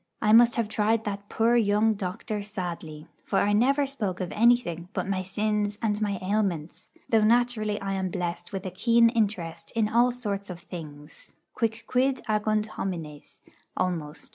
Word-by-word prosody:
I 215 -1 +3
must 235 +1 +7
have 230 -3 0
tried 220 +1 +1
that 205 -1 -5
poor 230 +2 +2
young 215 -1 +3
doctor 205 +2 -4
sadly; 170 -6 -6 0.2
for 195 - -1
I 205 +1 +3
never 275 +7 +3
spoke 215 -10 -3
of 185 -2 -3
anything 210 -7 +2
but - - -2
my 195 -1 -1
sins 205 +2 -1
and 215 -2 -1
my 205 -2 0
ailments, 185 -5 -2 0.2
though 220 -2 +3
naturally 220 -2 +2
I 195 0 -3
am 190 -1 -1
blessed 175 -1 -4
with 195 -2 -5
a 185 - -3
keen 230 +5 +4
interest 175 -8 -2
in 225 -2 +2
all 235 +3 +4
sorts 205 -5 -4
of 180 -1 -7
things 155 -4 -11 0.2
quicquid 250 +4 0
agunt 215 0 +1
homines, 165 -8 -6 0.4
almost. 165 -4 -3
205 Hz, 165 wpm, -27 LUFS, 180-225 Hz, 0.4 s, must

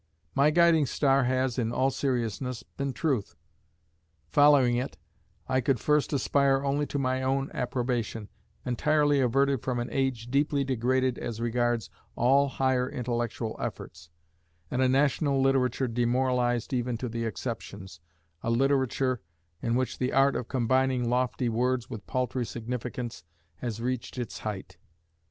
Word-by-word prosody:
My 140 +2 +4
guiding 165 -2 +4
star 135 -1 +2
has, 130 0 0
in 115 -1 0
all 135 +2 +1
seriousness, 125 -2 -2
been 140 +3 -4
truth. 130 -7 -1 0.9
Following 140 - +5
it, 125 +2 -3 0.5
I 130 0 +1
could 130 -1 +1
first 150 +3 +2
aspire 140 0 +2
only 140 +1 0
to - - -3
my 130 -1 0
own 135 +1 0
approbation, 120 -4 -2 0.4
entirely 145 +3 +2
averted 135 +1 +2
from 130 -2 -2
an 120 - -3
age 130 -4 -1
deeply 140 0 +2
degraded 130 0 0
as 115 -2 -5
regards 120 -1 0 0.2
all 135 +4 +4
higher 130 -1 0
intellectual 120 -2 -3
efforts, 80 0 -6 0.6
and 125 - 0
a 130 - +4
national 140 +1 +2
literature 135 -1 +2
demoralised 120 0 0
even 125 -1 -1
to 125 - -4
the 115 0 -3
exceptions, 100 -5 -6 0.4
a - - -2
literature 130 0 +1 0.4
in 115 0 0
which 130 0 -1
the 125 0 -1
art 135 +1 +4
of 120 - -3
combining 130 -1 +1
lofty 125 0 0
words 125 +2 0
with 110 -5 -7
paltry 125 0 -1
significance 120 0 -5 0.3
has 115 -3 -4
reached 125 +1 -3
its 120 -3 -4
height. 105 -3 -6
125 Hz, 140 wpm, -28 LUFS, 120-135 Hz, 0.9 s, Following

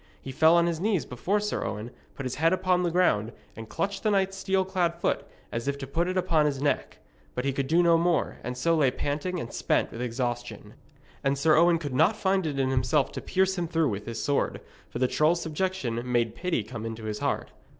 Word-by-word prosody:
He 135 - -7
fell 160 +5 +5
on 170 0 +4
his 170 -2 -1
knees 200 -2 0
before 185 - -1
Sir 210 0 -2
Owen, 105 +4 -4 0.2
put 135 - -6
his 130 - -2
head 165 +2 +4
upon 185 -1 +2
the 175 - +1
ground, 120 - +2 0.2
and 110 -1 -9
clutched 195 +4 -2
the 215 - +1
knight's 195 -1 +1
steel 190 -1 0
clad 180 -3 0
foot 170 - -1 0.2
as 115 +3 -4
if 140 0 0
to 140 - -6
put 165 +6 -1
it 185 +1 -1
upon 165 -5 +3
his 140 -2 -2
neck. 145 +1 -1 0.4
But 125 - -2
he 135 - +1
could 135 0 -2
do 170 +4 +4
no 170 -1 +5
more, 170 -1 0
and 125 +1 -4
so 165 +6 +2
lay 145 -5 +4
panting 150 +7 -3
and 120 - -6
spent - - 0
with 115 - -6
exhaustion. 120 -3 -4 0.5
And 140 0 +1
Sir 155 +3 +4
Owen 170 +1 +5
could 145 -5 -5
not 160 +11 +4
find 190 -4 +1
it 145 -3 -3
in 130 -1 +1
himself 130 +2 +1
to - - -6
pierce 190 0 +1
him 170 - -1
through 160 -2 +1
with 105 -1 -5
his 115 -1 -4
sword, 145 - 0 0.3
for - - -6
the 130 - +2
troll's 160 +6 +2
subjection 160 -8 -2
made 120 -2 0
pity 165 -1 -1
come 110 +1 -7
into 115 0 -6
his 105 -1 -4
heart. - - -2
150 Hz, 235 wpm, -27 LUFS, 125-180 Hz, 0.5 s, fell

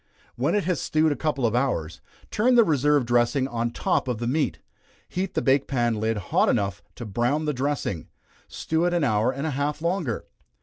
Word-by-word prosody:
When 140 +10 0
it 205 - +1
has 180 +1 -1
stewed 155 0 +2
a - - 0
couple 140 -2 -1
of 115 - +1
hours, 120 - -1 0.3
turn 245 +4 +3
the 235 - +7
reserved 145 - +2
dressing 120 +3 +2
on 120 -2 -2
top 120 - -1
of 125 -3 -1
the 120 - -4
meat, 145 +5 0 0.5
heat 185 +1 -3
the - - 0
bake 135 +1 +3
pan 120 -4 0
lid 110 0 0
hot 95 - +1
enough 100 -3 0
to 120 - -7
brown 120 +9 0
the 150 - 0
dressing, 130 - -2 0.4
stew 160 +1 -2
it 175 0 +1
an 170 - +1
hour 110 -1 +2
and 140 +3 -4
a 160 - -1
half 145 +2 -2
longer. 170 - -2
135 Hz, 205 wpm, -25 LUFS, 120-155 Hz, 0.5 s, the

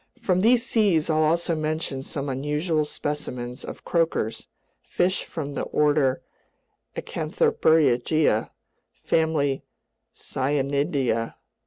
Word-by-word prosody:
From 185 -6 +1
these 235 +3 +4
seas 190 -10 +2
I'll 155 0 +2
also 165 +2 +2
mention 155 -3 -2
some 140 +1 -4
unusual 150 +4 0
specimens 125 -5 -4
of - - -9
croakers, 165 -10 0 0.3
fish 185 +2 0
from 145 -3 -5
the - - -3
order 145 -3 +1 0.7
Acanthopterygia, 155 - +2 0.4
family 150 -4 0 0.5
Scienidea. 140 -3 -1
150 Hz, 95 wpm, -25 LUFS, 135-165 Hz, 0.7 s, these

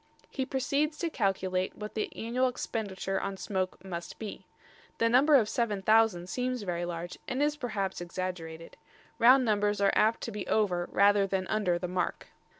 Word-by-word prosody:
He 265 -1 -2
proceeds 290 +3 0
to 335 -2 -2
calculate 190 -4 -1
what 210 0 -7
the 215 - -2
annual 245 +3 0
expenditure 200 -6 -3
on 195 -1 -4
smoke 185 -1 -3
must 175 -2 -6
be. 215 -3 -8 0.5
The 230 - +2
number 275 +5 +5
of 235 -6 +5
7000 215 -5 +2
seems 250 +3 -2
very 175 -2 -2
large 175 0 -6
and 260 - -2
is 295 +1 +2
perhaps 210 -10 -3
exaggerated. 170 -2 -6 0.4
Round 255 +2 +7
numbers 205 -2 +1
are 200 -1 +3
apt 220 +2 +3
to 230 - -4
be 210 -2 -5
over 180 -5 +1
rather 200 0 +4
than 190 -1 -1
under 205 -5 +1
the 180 - -4
mark. 180 0 -3
205 Hz, 165 wpm, -30 LUFS, 185-235 Hz, 0.5 s, Round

